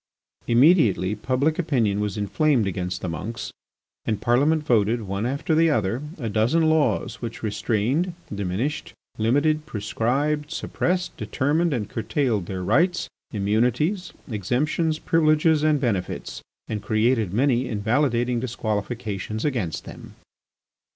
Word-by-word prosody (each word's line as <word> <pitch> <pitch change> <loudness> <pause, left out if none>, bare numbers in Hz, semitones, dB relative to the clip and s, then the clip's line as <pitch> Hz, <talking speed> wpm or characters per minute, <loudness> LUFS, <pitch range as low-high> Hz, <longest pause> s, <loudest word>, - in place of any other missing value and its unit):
Immediately 115 - +4
public 130 - 0
opinion 115 - +1
was 105 -1 -2
inflamed 115 - +2
against 90 -1 -3
the - - -3
monks, 105 +8 -5 0.5
and 110 - -1
Parliament 145 +6 +2
voted, 115 -2 +2
one 100 +3 -2
after 140 +6 -1
the 165 +1 +4
other, 110 -2 0 0.2
a 120 -7 -4
dozen 110 +10 +2
laws 155 -1 +1
which 115 -1 -6
restrained, 115 - 0 0.2
diminished, 100 - -3 0.2
limited, 150 +7 +2
prescribed, 140 +6 -1
suppressed, 180 +3 -2
determined, 155 +5 0
and 115 -7 -1
curtailed, 115 - -1
their 95 -2 -4
rights, 170 - +2 0.2
immunities, 125 - 0 0.2
exemptions, 135 - 0
privileges, 155 -1 +3
and 155 -1 +3
benefits, 105 -9 -2 0.3
and 105 -2 -3
created 110 -2 +1
many 125 +3 +2
invalidating 120 +2 +1
disqualifications 110 -2 -3
against 115 - -2
them. - - -11
120 Hz, 115 wpm, -24 LUFS, 105-150 Hz, 0.5 s, Immediately